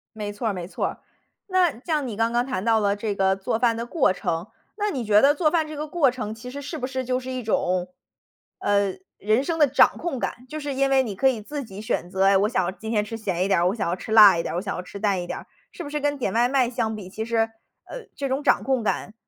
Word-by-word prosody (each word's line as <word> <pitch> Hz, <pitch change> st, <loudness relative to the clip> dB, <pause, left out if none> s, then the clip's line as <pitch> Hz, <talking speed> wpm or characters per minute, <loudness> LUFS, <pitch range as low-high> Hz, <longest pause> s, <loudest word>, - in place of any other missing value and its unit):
没 210 Hz, -1 st, -4 dB
错 215 Hz, +3 st, -4 dB
儿 210 Hz, -, 0 dB
没 180 Hz, -2 st, -5 dB
错 185 Hz, -, -3 dB
儿。 -, -, -6 dB, 0.5 s
那 365 Hz, -, +2 dB
像 300 Hz, -5 st, -1 dB
你 220 Hz, -, -5 dB
刚 225 Hz, +2 st, +1 dB
刚 240 Hz, +1 st, +1 dB
谈 255 Hz, -8 st, -3 dB
到 225 Hz, 0 st, +3 dB
了 205 Hz, -1 st, +1 dB, 0.4 s
做 220 Hz, +3 st, -1 dB
饭 235 Hz, -2 st, +3 dB
的 230 Hz, +1 st, -4 dB
过 260 Hz, -, +2 dB
程， 175 Hz, 0 st, -3 dB, 0.3 s
那 420 Hz, 0 st, 0 dB
你 265 Hz, -11 st, -3 dB
觉 210 Hz, -1 st, +5 dB
得 290 Hz, +2 st, +5 dB
做 305 Hz, -1 st, +2 dB
饭 320 Hz, -3 st, +1 dB
这 305 Hz, -, -7 dB
个 300 Hz, +1 st, -4 dB
过 300 Hz, -4 st, +3 dB
程 220 Hz, -4 st, -4 dB
其 230 Hz, +3 st, -9 dB
实 285 Hz, +2 st, -7 dB
是 295 Hz, +3 st, -6 dB
不 255 Hz, -3 st, -3 dB
是 260 Hz, -1 st, -3 dB
就 255 Hz, 0 st, -1 dB
是 255 Hz, -, -8 dB
一 255 Hz, -2 st, -4 dB
种， 180 Hz, -4 st, 0 dB, 0.7 s
呃， 200 Hz, -1 st, +1 dB, 0.2 s
人 215 Hz, +6 st, +1 dB
生 325 Hz, +2 st, -2 dB
的 295 Hz, -, +6 dB
掌 280 Hz, -, +4 dB
控 340 Hz, -5 st, -3 dB
感。 250 Hz, +1 st, -4 dB
就 310 Hz, -, -5 dB
是 285 Hz, -2 st, -4 dB
因 275 Hz, +1 st, +1 dB
为 270 Hz, -1 st, +4 dB
你 215 Hz, -5 st, -5 dB
可 265 Hz, +8 st, +3 dB
以 245 Hz, -5 st, +1 dB
自 290 Hz, +6 st, -5 dB
己 200 Hz, -1 st, -9 dB
选 180 Hz, -4 st, -2 dB
择， 190 Hz, +1 st, 0 dB
哎， 195 Hz, 0 st, +5 dB
我 205 Hz, +2 st, +2 dB
想 185 Hz, -6 st, -1 dB
今 220 Hz, -, -6 dB
天 210 Hz, -2 st, +2 dB
吃 225 Hz, +2 st, -6 dB
咸 185 Hz, -5 st, -1 dB
一 -, -, 0 dB
点 195 Hz, -, +3 dB
儿、 175 Hz, -, +3 dB
我 200 Hz, -, -2 dB
想 215 Hz, -, -2 dB
要 175 Hz, -, 0 dB
吃 220 Hz, -, -9 dB
辣 210 Hz, -5 st, +9 dB
一 -, -, 0 dB
点 -, -, -4 dB
儿、 -, -, -2 dB
我 -, -, -1 dB
想 200 Hz, -1 st, -3 dB
要 180 Hz, -, -4 dB
吃 190 Hz, +2 st, -10 dB
淡 200 Hz, -4 st, +1 dB
一 175 Hz, -, -6 dB
点 -, -, -4 dB
儿。 -, -, -10 dB, 0.3 s
是 345 Hz, -, -8 dB
不 285 Hz, -, -7 dB
是 295 Hz, 0 st, -2 dB
跟 290 Hz, 0 st, 0 dB
点 240 Hz, -8 st, -1 dB
外 235 Hz, +2 st, +3 dB
卖 255 Hz, -2 st, +2 dB
相 225 Hz, -3 st, -2 dB
比 190 Hz, -3 st, -8 dB
其 220 Hz, +3 st, -5 dB
实， 230 Hz, 0 st, -1 dB, 0.5 s
呃， -, -, -8 dB
这 275 Hz, -1 st, -3 dB
种 265 Hz, +2 st, -1 dB
掌 290 Hz, -, +3 dB
控 265 Hz, -3 st, +1 dB
感 210 Hz, -, -2 dB
230 Hz, 310 characters per minute, -24 LUFS, 205-275 Hz, 0.7 s, 辣